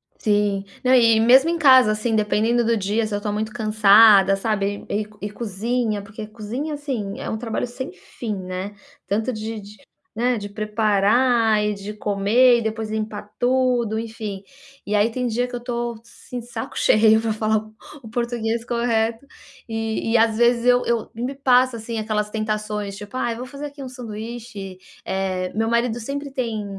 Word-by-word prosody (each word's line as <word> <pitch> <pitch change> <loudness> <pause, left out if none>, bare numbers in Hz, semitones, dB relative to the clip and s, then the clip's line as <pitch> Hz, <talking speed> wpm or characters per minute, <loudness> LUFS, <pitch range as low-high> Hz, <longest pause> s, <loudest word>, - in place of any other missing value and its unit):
Sim. 205 -2 0 0.2
Não, 255 0 +4
e 230 -3 +5
mesmo 260 +7 +6
em 340 - 0
casa, 260 -7 +6
assim, 215 +2 -1
dependendo 220 +3 +2
do 230 0 +2
dia 210 +3 0
se 215 - -5
eu 205 - -2
tô 210 0 -2
muito 215 +1 -2
cansada, 215 -3 +6
sabe, 205 -1 -2
e 210 - 0
e - - -13 0.2
e - - -7
cozinha, 220 +1 -2
porque 215 +1 -8
cozinha, 235 +8 -5
assim, 255 -9 -4
é - - -5
um 220 - -2
trabalho 230 +1 -3
sem 260 -1 -6
fim, 210 +4 -6
né, 185 +2 -6 0.3
tanto 220 +5 0
de 220 0 -5
de, 205 +1 -13 0.4
né, 245 0 +1
de 205 0 -7
preparar 215 +2 +2
e 210 0 0
de 200 +1 -7
comer 210 +5 +3
e 235 - -2
depois 220 0 -3
limpar 215 -1 -4
tudo, 245 -3 +1
enfim. 220 -3 -6 0.5
E 210 - 0
aí 210 +2 +3
tem 250 +1 -2
dia 240 +2 0
que 245 - -7
eu - - -4
tô, 240 -1 -3
assim, 235 +1 -9
de 235 - -11
saco 225 -2 -6
cheio 220 0 +4
pra 225 -1 -1
falar 215 0 +1
o 215 0 -7 0.3
o - - -10
português 235 -1 -2
correto. 235 0 0 0.5
E 225 0 -2
e 235 - +6
às 225 0 +3
vezes 240 0 +3
eu 245 0 +4
eu 235 -2 -1
e 230 - -6
me 260 +3 -3
passa, 255 -2 +3
assim, 225 0 -5
aquelas 210 -1 -2
tentações, 215 -2 -3
tipo: 205 +4 -10
"Ai, 240 -2 -1
vou 245 +2 -6
fazer 280 +3 -7
aqui 285 -1 -10
um 260 - -7
sanduíche", 225 -5 -8 0.3
eh, 185 -1 -2
meu 225 +1 0
marido 235 0 +1
sempre 280 +4 -5
tem, 230 -5 -3
220 Hz, 190 wpm, -22 LUFS, 210-240 Hz, 0.5 s, mesmo